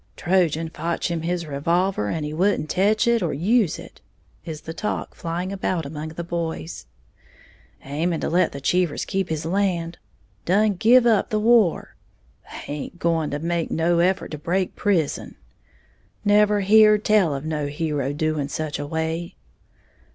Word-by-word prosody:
"Trojan 165 -3 +1
fotch 165 +2 -3
him 170 -1 -2
his 170 +1 -2
revolver 165 - 0
and 155 +3 -2
he 150 - -5
wouldn't 175 -2 0
tech 205 +3 +2
it 235 -1 +2
or 170 - -1
use 200 - +2
it," - - -13 0.4
is 160 -2 -7
the 160 - -7
talk 210 - -4
flying 175 +3 -4
about 185 -4 -2
among 150 +2 -6
the 160 +2 -6
boys. 165 - -5 1.0
"Aiming 160 +4 -2
to - - -1
let 180 +3 +2
the 140 - -7
Cheevers 175 +2 0
keep 190 -2 -2
his 160 0 -3
land." 175 -2 -1 0.4
"Done 205 +4 +3
give 235 +6 +5
up 225 -4 +3
the 215 - 0
war." 220 -5 +3 0.5
"Haint 150 +4 -7
going 165 -3 0
to 145 - -2
make 170 +1 -2
no 170 +1 +1
effort 185 +2 +1
to 150 - -6
break 180 +4 -1
prison." 180 -8 -1 0.9
"Never 205 0 +4
heared 215 +1 +5
tell 195 -9 +3
of 135 +2 -6
no 150 -2 -2
hero 145 -2 -2
doing 155 -1 -1
such 150 +1 -4
a 145 - -4
way!" 160 +2 -3
170 Hz, 160 wpm, -23 LUFS, 155-195 Hz, 1.0 s, give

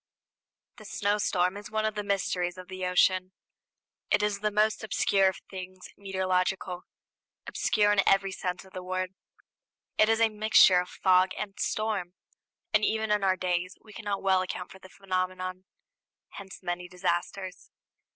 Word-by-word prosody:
The - - -12
snowstorm 200 -3 +1
is 205 - -9
one 215 0 -1
of 215 - 0
the 210 - -3
mysteries 185 -3 -1
of 185 0 -10
the 185 -1 -3
ocean. 185 +1 +2 0.8
It 210 - +3
is 205 -1 0
the 210 +1 0
most 210 +1 +1
obscure 195 -2 +2
of 190 - -6
things 185 -1 -9
meteorological 185 -1 -1 0.6
obscure 205 -1 +2
in 205 -1 +4
every 195 0 +4
sense 180 -1 -4
of 190 - -18
the 185 - -5
word. 185 0 -3 0.9
It 215 - +6
is 225 0 +3
a 230 -1 +4
mixture 210 -3 +6
of 180 0 -3
fog 185 0 +3
and 205 -1 -4
storm; 205 -5 -1 0.6
and 215 - +4
even 220 0 +1
in 210 -1 +2
our 190 -1 +3
days 180 0 -1
we 215 - -15
cannot 205 -2 -4
well 190 -1 +4
account 180 -1 -5
for 190 - -13
the 190 - -14
phenomenon. 185 -1 -3 0.6
Hence 195 -2 -10
many 175 0 -3
disasters. 180 +1 -3
190 Hz, 160 wpm, -28 LUFS, 185-205 Hz, 0.9 s, It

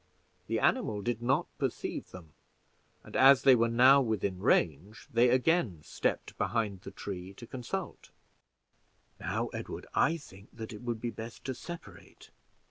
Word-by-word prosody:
The - - 0
animal 105 -2 +1
did 120 +1 -2
not 130 +3 +2
perceive - - -3
them, 80 -5 -12 0.7
and - - -12
as 135 0 +7
they 135 - +8
were 115 -1 +3
now 130 +4 +6
within 100 -6 -1
range, 95 - +1
they 120 +2 +5
again 130 - +2
stepped - - -2
behind 105 -3 -1
the - - -8
tree 95 -1 -7
to 120 - -10
consult. 125 0 -6 1.1
"Now, - - -2
Edward, - - -6
I 165 +2 +3
think 100 -10 -15
that 110 -1 -7
it 105 - -9
would 120 -2 -3
be 120 - -2
best 115 +2 -9
to 130 - -2
separate. 170 +6 -11
115 Hz, 150 wpm, -31 LUFS, 100-130 Hz, 1.1 s, they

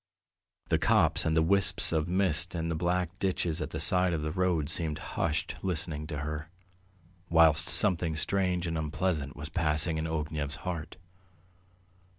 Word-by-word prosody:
The - - +2
copse - - +2
and 80 0 +1
the 80 - +4
wisps 100 +3 +3
of 80 0 0
mist 90 -2 +1
and 85 0 -2
the - - -2
black 90 +2 -2
ditches 90 -4 -1
at - - -4
the - - -6
side 90 -1 +3
of 80 -2 -2
the 75 - -3
road 90 -5 0
seemed 80 -1 +2
hushed 75 0 -3
listening 80 -4 -3
to 75 -3 -5
her, 75 +1 -5 0.8
whilst 80 -1 +4
something 90 -5 +4
strange 90 +1 -1
and 80 -1 -3
unpleasant 75 -1 -2
was 75 +2 -8
passing 80 -1 0
in 80 - -3
Ognev's 75 -2 -3
heart. 85 -2 -5
80 Hz, 160 wpm, -29 LUFS, 75-90 Hz, 0.8 s, the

